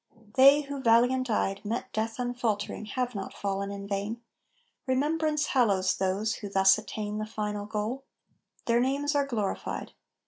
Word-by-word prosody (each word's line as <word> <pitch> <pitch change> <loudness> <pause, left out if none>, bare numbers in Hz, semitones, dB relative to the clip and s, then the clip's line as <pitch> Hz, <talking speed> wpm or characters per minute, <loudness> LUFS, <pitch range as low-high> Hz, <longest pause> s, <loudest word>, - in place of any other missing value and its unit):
They 275 +3 +7
who, 280 -1 -6
valiant 245 +2 +3
eyed, 195 -2 0
Met 225 +3 -4
death 225 +1 -2
unfaltering 240 -4 -2
have 250 -1 -1
not 195 -2 -6
fallen 200 0 -2
in 200 0 -6
vain; 205 +3 -3 0.7
Remembrance 300 +3 +1
hallows 200 -8 +3
those 195 +4 0
who 205 - -7
thus 195 +1 +5
attain 210 -1 -5
The 215 - -3
final 210 -1 -4
goal; 220 +5 -3 0.6
their 235 0 +3
names 280 +4 +1
are 285 -1 +1
glorified. 215 -7 -3
225 Hz, 145 wpm, -28 LUFS, 205-260 Hz, 0.7 s, They